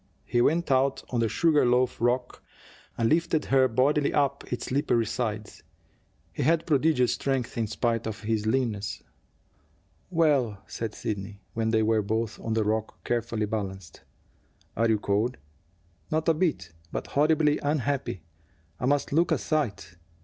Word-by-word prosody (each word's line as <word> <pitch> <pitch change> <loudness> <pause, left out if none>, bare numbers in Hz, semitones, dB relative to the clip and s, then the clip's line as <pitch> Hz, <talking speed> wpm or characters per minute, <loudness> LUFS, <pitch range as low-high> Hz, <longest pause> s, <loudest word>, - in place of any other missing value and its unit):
He 120 0 +1
went 165 +4 +2
out 135 +1 +2
on 120 - 0
the 115 -1 +2
sugar 160 +1 +3
loaf 125 0 +2
rock, 125 +1 0 0.6
and 115 - +2
lifted 160 +1 +1
her 130 -1 +4
bodily 140 +5 +2
up 140 -1 +1
its 125 - -3
slippery 125 -4 +1
sides. 110 -2 -4 0.7
He - - -4
had 165 +4 +2
prodigious 145 -4 +3
strength, 135 -3 -2
in 115 -2 -1
spite 115 +1 -1
of 110 -1 -5
his 110 -1 -1
leanness. 110 -4 -1 1.1
"Well!" 140 - +1
said 115 -2 -5
Sidney, 100 -1 -5
when 110 0 0
they 110 -1 +2
were 110 0 +2
both 110 +2 -2
on 115 - -3
the 110 - +2
rock, 110 +1 -2
carefully 115 -2 -1
balanced. 95 -4 -5 0.7
"Are 115 +1 +2
you 110 - +3
cold?" 105 +4 0 0.7
"Not 155 +1 -1
a 165 - +5
bit. 155 - -1 0.2
But - - -3
horribly 150 0 +2
unhappy. 145 - -1 0.6
I 125 - -1
must 145 0 +1
look 170 +3 +3
a - - +3
sight." 105 - -2
120 Hz, 150 wpm, -27 LUFS, 110-145 Hz, 1.1 s, a